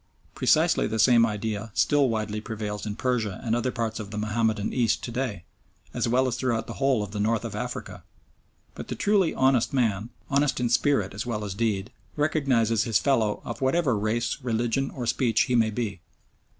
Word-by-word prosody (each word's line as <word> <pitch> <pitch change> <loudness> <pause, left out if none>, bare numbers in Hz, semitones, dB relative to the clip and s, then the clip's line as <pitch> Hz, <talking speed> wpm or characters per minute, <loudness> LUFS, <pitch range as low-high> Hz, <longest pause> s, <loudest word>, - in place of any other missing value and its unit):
Precisely - - +3
the 110 - -2
same 115 +1 +5
idea 110 0 -3
still 145 -3 +3
widely 110 -1 -2
prevails 110 -1 -5
in 105 - -3
Persia 115 -6 -1
and 115 -1 0
other 120 +2 0
parts 115 -2 -3
of 105 -2 -6
the 105 - -6
Mahomedan 110 0 0
East 120 -4 +1
to 120 - -4
day, 120 -8 -3 0.5
as - - -1
well 130 +3 +2
as 125 - -1
throughout 115 -4 -1
the - - -7
whole 135 -5 +2
of 100 - -7
the 105 - -4
North 110 +2 0
of 115 - -5
Africa. 125 +3 -5 0.7
But - - -8
the - - -4
truly 200 -4 +2
honest 130 0 +2
man, 115 -4 0 0.2
honest 140 -1 +1
in 120 -1 0
spirit 120 -5 +2
as 105 +4 -5
well 105 -3 -2
as 100 - -4
deed, 100 -2 -1 0.2
recognises 130 -8 +2
his 110 -2 +2
fellow 110 -5 +1
of - - -6
whatever 135 -1 +2
race, 110 +6 -1
religion, 120 +2 0
or 125 - -5
speech 115 -1 +2
he 125 - +1
may 115 -2 +3
be. 105 -5 -4
115 Hz, 190 wpm, -26 LUFS, 105-125 Hz, 0.7 s, same